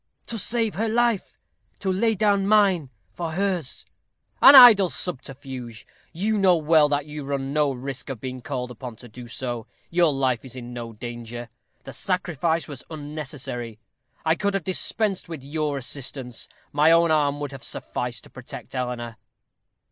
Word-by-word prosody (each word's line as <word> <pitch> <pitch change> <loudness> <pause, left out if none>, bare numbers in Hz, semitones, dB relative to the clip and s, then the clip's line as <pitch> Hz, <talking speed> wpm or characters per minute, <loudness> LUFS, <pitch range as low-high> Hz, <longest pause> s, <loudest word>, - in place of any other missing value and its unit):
"To 230 - -4
save 225 0 0
her 220 +2 -1
life; 235 -2 +1 0.4
to 190 - -1
lay 225 +4 +2
down 200 -1 +2
mine 195 -9 +4 0.2
for 165 -2 -4
hers." 180 -6 -2 0.6
"An 280 - +10
idle 225 -8 +10
subterfuge. 130 -8 -5 0.3
You 210 +5 0
know 185 -3 +5
well 155 -1 +4
that 145 0 0
you 150 -1 -7
run 135 0 -3
no 150 -2 +2
risk 130 +1 -5
of 130 -4 -5
being 130 +2 -6
called 125 -2 -4
upon 120 0 -8
to 120 - -13
do 120 +2 -11
so. 120 0 -5 0.2
Your 170 -2 +4
life 130 -4 0
is 130 -1 -10
in 120 -1 -8
no 120 -1 -6
danger. 120 +1 -7 0.3
The 135 - -9
sacrifice 170 - -1
was 140 -4 -8
unnecessary. 145 -7 -5 0.5
I 160 - +4
could 200 +3 -1
have 195 - -1
dispensed 190 +1 0
with 160 -5 -7
your 150 0 -2
assistance; 130 -2 -4 0.2
my 150 +3 +4
own 170 0 +5
arm 145 -2 +2
would 145 -1 -4
have 135 -2 -10
sufficed - - -5
to - - -17
protect - - -10
Eleanor." 125 -3 -4
145 Hz, 165 wpm, -24 LUFS, 125-180 Hz, 0.6 s, An